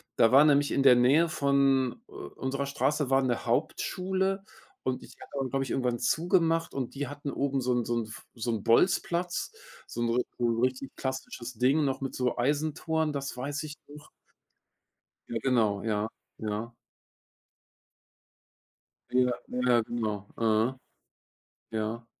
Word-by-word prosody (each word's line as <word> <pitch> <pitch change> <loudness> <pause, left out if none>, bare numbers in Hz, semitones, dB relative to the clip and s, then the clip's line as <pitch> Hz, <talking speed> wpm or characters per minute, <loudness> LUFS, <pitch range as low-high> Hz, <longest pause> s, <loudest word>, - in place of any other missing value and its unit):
da 115 - +5
war 135 +3 +8
nämlich 145 -1 +4
in - - +2
der 135 -2 +8
Nähe 140 +7 +4
von, 140 -3 +2
äh, - - -22
unserer 130 - -4
Straße 140 +1 0
war 135 0 +5
'ne 125 -3 -1
Hauptschule 190 +1 0 0.4
und 130 -1 -2
die - - -11
hat - - -10
dann, 135 -1 -1
glaube 135 0 +1
ich, - - -8
irgendwann 125 -2 0
zugemacht 165 +1 +2
und 135 -2 -4
die 145 0 -3
hatten 145 +1 -6
oben 135 -1 0
so 125 0 +1
'n 120 -1 0
so 120 - -1
'n 115 - -3
f 110 - -10
so 115 0 -4
'n 110 -3 -2
Bolzplatz, 175 +7 +2 0.3
so 120 - -6
'n 120 - +1 0.3
so 120 - +2
'n 115 -1 0
richtig 130 +1 -1
klassisches 130 -2 -5
Ding 135 +6 +3
noch 135 -1 -1
mit 135 - -4
so 125 -1 0
Eisentoren, 155 +3 0
das 140 -3 -4
weiß 140 +3 -3
ich 150 -1 -7
noch. 150 +1 -13 1.2
Ja, 115 - -1
genau. 110 -6 +2
Ja, 105 -1 0 0.3
ja. 110 +2 -3 2.4
Ja, 125 0 +3 0.2
ja, 125 -1 +3
genau. 110 -3 -3
Äh. 110 +2 +2 1.0
Ja. 110 +2 -3
130 Hz, 155 wpm, -29 LUFS, 120-145 Hz, 2.4 s, war